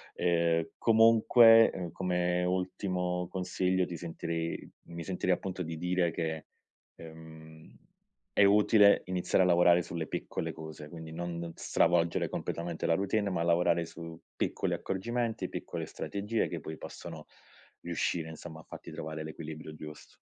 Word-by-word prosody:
Ehm, 85 -1 +2
comunque 115 -4 +6
come 90 -1 0
ultimo 90 -1 -1
consiglio 90 0 0
ti 85 - -6
sentirei 85 0 -4 0.2
mi 85 0 -7
sentirei 90 -1 +1
appunto 95 -1 -5
di 80 -1 -4
dire, 90 +1 +1
che, 80 -1 -3 0.5
ehm, 80 -1 -13 0.6
è - - +5
utile 105 0 +5
iniziare 90 +1 +1
a 90 - +3
lavorare 85 0 +5
sulle 85 -2 -5
piccole - - -4
cose, 80 -2 -9
quindi 80 0 -9
non 85 +1 -4
non 85 0 -5
stravolgere 85 0 +2
completamente 85 -1 -3
la 80 - +3
routine, 100 +2 0
ma 90 -3 -1
lavorare 85 0 +2
su 85 0 -9 0.2
piccoli - - -1
accorgimenti, 115 +4 -2
piccole - - -5
strategie, 105 +3 -2
che 85 - -5
poi 80 +2 -7
possono - - -9 0.6
riuscire 85 -1 -2
insomma 80 0 -9
a - - -18
farti - - -10
trovare 80 0 -5
l'equilibrio 80 0 -8
giusto. 75 -1 -11
85 Hz, 135 wpm, -31 LUFS, 80-95 Hz, 0.6 s, comunque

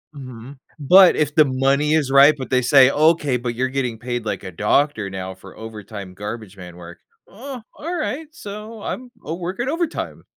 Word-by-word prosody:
Mhm. 130 0 -10 0.2
But 180 +6 +7
if 150 -1 -1
the 155 - +6
money 135 +3 +1
is 145 -4 +1
right, 140 +2 +7
but 130 - -6
they 130 -1 +2
say, 130 +1 +6
"Okay, 150 -4 +2
but 120 -1 -4
you're 130 +2 -1
getting 130 -4 -2
paid 120 0 -4
like 105 - -3
a 95 - -7
doctor 105 - +1
now 95 0 -6
for 95 0 -15
overtime 105 -3 -9
garbage 105 +1 -7
man 90 -2 -10
work." 85 0 -12 0.3
"Uh, 250 +4 -9 0.2
alright, 320 -2 -3
so, 210 -2 -9
I'm 250 +3 -6
I'm 165 +4 -5
working 185 +9 -3
overtime." 335 +1 -3
135 Hz, 180 wpm, -21 LUFS, 110-170 Hz, 0.3 s, But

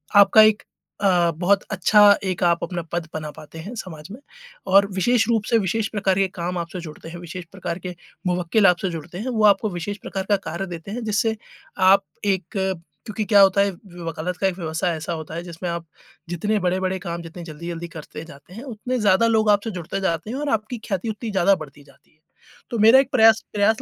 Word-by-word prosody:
आपका 205 +2 +8
एक 215 -1 +4 0.4
अ, 175 -3 +3
बहुत 190 +4 +2
अच्छा 210 +2 +4 0.2
एक 185 -1 -2
आप 170 -1 +2
अपना 175 0 -3
पद 170 -1 -2
बना 155 -1 -4
पाते 160 +2 -12
हैं 200 +9 -7
समाज 160 -8 -8
में। 235 - -9 0.5
और 200 +1 +7
विशेष 225 +4 +2
रूप 225 -2 +2
से 230 - +4
विशेष 215 +3 -1
प्रकार 195 -3 0
के 195 - +3
काम 180 +1 -3
आपसे 170 +1 -5
जुड़ते 160 0 -10
हैं, 175 - -8
विशेष 175 +1 -8
प्रकार 175 -2 -5
के 180 - -5 0.3
मुवक्किल 180 +3 +2
आपसे 180 +2 +2
जुड़ते 170 +2 -7
हैं, 240 +6 -4
वो 220 -3 0
आपको 205 +1 +4
विशेष 195 +3 -5
प्रकार 195 -1 -4
का 205 - +5
कार्य 170 +4 -3
देते 170 +2 -8
हैं 240 +1 -4
जिससे 220 +1 +1 0.5
आप 195 +1 +6 0.2
एक 190 -3 +1
क्योंकि 190 +3 -4
क्या 205 -1 +6
होता 195 0 +5
है, 200 - +2 0.3
वकालत 165 +2 -4
का 195 - +1
एक 185 - -2
व्यवसाय 165 +1 -1
ऐसा 155 +2 -4
होता 160 0 -7
है 170 - -4
जिसमें 175 0 -6
आप 170 0 -5 0.4
जितने 205 +5 0
बड़े-बड़े 185 +1 -1
काम 170 -2 -5
जितने 170 +1 -9
जल्दी-जल्दी 170 +2 -7
करते 155 +1 -9
जाते 165 +2 -15
हैं, 230 - -8
उतने 250 0 -4
ज़्यादा 210 +1 +4
लोग 220 -2 +2
आपसे 205 +2 +1
जुड़ते 195 +5 -4
जाते 170 +2 -1
हैं 260 - -4
और 295 0 -2
आपकी 220 +2 -1
ख्याति 195 +1 -2
उतनी 220 +1 -5
ज़्यादा 195 0 +4
बढ़ती 145 -3 -11
जाती 140 -1 -24
है। 155 - -35 0.5
तो 235 - -2
मेरा 225 +5 +7
एक 270 0 0
प्रयास 225 -2 +5
प्रयास 210 +2 +2
190 Hz, 210 wpm, -22 LUFS, 170-215 Hz, 0.5 s, आपका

